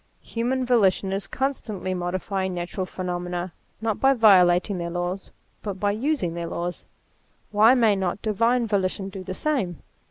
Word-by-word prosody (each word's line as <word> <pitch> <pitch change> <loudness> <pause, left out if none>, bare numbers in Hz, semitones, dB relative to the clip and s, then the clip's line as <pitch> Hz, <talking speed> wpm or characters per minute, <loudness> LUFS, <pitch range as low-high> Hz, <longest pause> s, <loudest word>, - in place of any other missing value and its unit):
Human 250 +3 -1
volition 195 -5 +2
is 195 +1 -3
constantly 220 -8 -3
modi 175 0 -2
fying 190 0 -2
natural 175 +2 -4
phenomena, 180 -1 -4 0.3
not 220 -2 -1
by 270 0 +5
violating 185 -4 +5
their 170 0 -3
laws, 175 +2 -3 0.3
but 200 -3 -5
by 205 +1 +1
using 220 - -1
their 170 0 -4
laws. 175 +1 -4 0.7
Why 215 +4 +6
may 225 -5 +4
not 190 0 -2
divine 230 +3 +2
volition 195 -2 -1
do 190 -1 -8
the 185 0 -5
same? 240 - -2
195 Hz, 155 wpm, -24 LUFS, 180-225 Hz, 0.7 s, Why